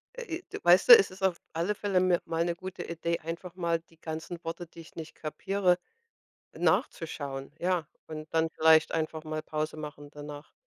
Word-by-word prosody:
Äh, 470 -10 -5
i 360 - -7 0.2
Weißt 175 +1 +6
du, - - +12
es 410 - +2
ist 185 +1 -12
auf 185 -3 +1
alle 170 +6 0
Fälle 200 -3 +1
mi 180 -1 +4
mal 165 0 0
'ne 175 - 0
gute 185 +2 -7
Idee, 170 0 -2
einfach 170 +2 -6
mal 170 -2 0
die 165 -1 -26
ganzen 160 +2 -6
Worte, 165 +1 -5
die 165 +1 -13
ich 160 - -14
nicht 160 -1 -8
kapiere, 180 +3 +1 0.7
nachzuschauen, 140 -4 -1
ja. 175 -3 0 0.2
Und 155 0 -8
dann 160 0 +2
vielleicht 160 0 +5
einfach 160 0 -2
mal 155 0 -3
Pause 155 0 -3
machen 145 -1 -8
danach. 145 0 -9
165 Hz, 185 wpm, -29 LUFS, 155-180 Hz, 0.7 s, du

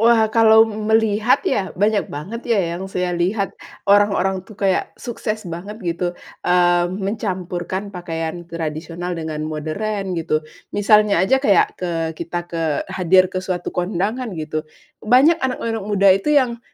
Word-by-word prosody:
Wah, 225 -1 +5
kalau 220 0 +6
melihat 220 +1 +2
ya, 190 -2 -1
banyak 205 +2 +1
banget 195 +12 -6
ya 175 -6 0
yang 190 - -6
saya 180 -2 -2
lihat, 195 +4 -1 0.3
orang-orang 195 -2 +3
tuh 215 - -13
kayak 195 -2 0
sukses 220 -4 -4
banget 180 +6 -7
gitu, 175 0 -2 0.3
eee, 175 -1 +4
mencampurkan 190 -2 -3
pakaian 170 -2 -5
tradisional 165 +2 -5
dengan 160 -2 -4
modern, 190 +6 -3
gitu. 155 -2 -1 0.3
Misalnya 210 0 +4
aja 265 +7 +3
kayak 200 -10 +2
ke 180 - -2 0.2
kita 170 +2 -5
ke 165 -3 -2
hadir 185 +1 +3
ke 185 - -1
suatu 185 -1 -4
kondangan 200 +7 -2
gitu, 155 0 -4 0.3
banyak 270 +9 +4
anak-anak 230 -4 -2
muda 200 -1 +4
itu 195 +8 -1
yang 255 -6 +2
190 Hz, 140 wpm, -20 LUFS, 175-215 Hz, 0.3 s, kalau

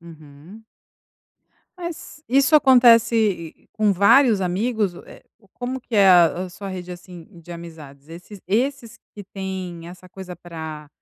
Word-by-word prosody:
uhum. 160 +5 -15 1.1
Mas 345 -4 -9
isso 275 +4 +3
acontece 230 - +3
com 215 -2 +1
vários 210 +3 +4
amigos, 200 +2 -1
eh, - - -15 0.3
como 255 +1 -5
que 235 - -9
é 195 -1 +5
a 175 0 +4
a - - -8
sua 200 +2 -9
rede 180 -1 -7
assim 175 -1 -12
de 170 - -16
amizades? 160 -4 -11
Esses 180 +4 -12
esses 240 +4 -2 0.2
que 205 -2 -10
têm 185 -3 -7
essa 180 +1 -14
coisa 180 -1 -10
para 160 -3 -9
190 Hz, 135 wpm, -21 LUFS, 170-230 Hz, 1.1 s, é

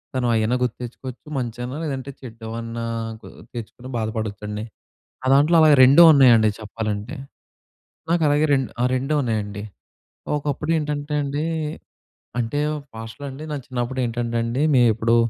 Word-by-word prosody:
తను 125 -1 +1
అయ్యేనా 110 +2 +1
గుర్తు 125 -2 -1
తెచ్చుకోవచ్చు 125 +3 -9
మంచైనా. 120 +1 -4
లేదంటే 135 -3 -4
చెడ్డవన్నా 115 -1 -6 0.4
గుర్తు - - -13
తెచ్చుకొని 120 +3 -8
బాధపడొచ్చండి. 110 -1 -3 0.6
నా 130 - -3
దాంట్లో 145 +5 +5
అలాగ 155 -1 +7
రెండూ 135 +6 +8
ఉన్నయండి 120 -6 +6
చెప్పాలంటే. 110 +3 -4 0.9
నాకలాగే 155 -3 +3
రెండు 135 -2 +1
ఆ! - - +3
రెండు 135 +4 -1
ఉన్నయండి. 105 -4 -2 0.7
ఒకప్పుడేంటంటే 150 0 -2
అండి, 145 +2 -2 1.0
అంటేవ్ 145 +6 -1 0.2
పాస్ట్‌లో 115 +5 -8
అండి 135 +4 -8
నా 150 - -2
చిన్నప్పుడేంటంటండి 120 -1 -2
మే 125 - +6
ఇప్పుడు, 115 +1 +2
125 Hz, 120 wpm, -22 LUFS, 115-145 Hz, 1.0 s, రెండూ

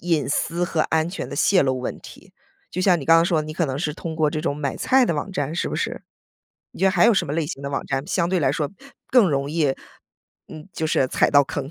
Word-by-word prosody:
隐 165 -5 0
私 170 +4 -1
和 170 -2 -1
安 160 0 0
全 175 - -6
的 - - -6
泄 195 -5 +4
露 130 -1 0
问 125 - -4
题？ - - -14 0.4
就 180 - -4
像 185 -3 +3
你 - - -6
刚 165 +3 +6
刚 165 - +4
说 165 -2 +1
的， 155 - -8
你 155 - -6
可 165 +1 -1
能 135 0 -3
是 150 -2 -2
通 165 0 -6
过 155 -2 +2
这 155 - -3
种 150 -3 -2
买 140 -2 -3
菜 260 0 +3
的 170 - 0
网 150 +6 -4
站， 145 -3 -2
是 175 - -1
不 - - -4
是？ - - -3 0.7
你 - - -12
觉 190 - +4
得 190 - +4
还 180 -2 +4
有 235 - +5
什 - - +1
么 140 - -4
类 160 -1 -1
型 140 - -7
的 140 - -4
网 135 - -3
站 135 +2 -2
相 170 -2 0
对 185 - +1
来 135 -2 +2
说 150 -1 -2 0.4
更 240 -7 +5
容 140 0 -1
易， 150 -4 +1 0.7
嗯， 155 +4 -11
就 160 - -2
是 135 -4 +2
踩 - - +2
到 145 0 +6
坑？ 135 +1 -5
155 Hz, 295 characters per minute, -22 LUFS, 145-175 Hz, 0.7 s, 刚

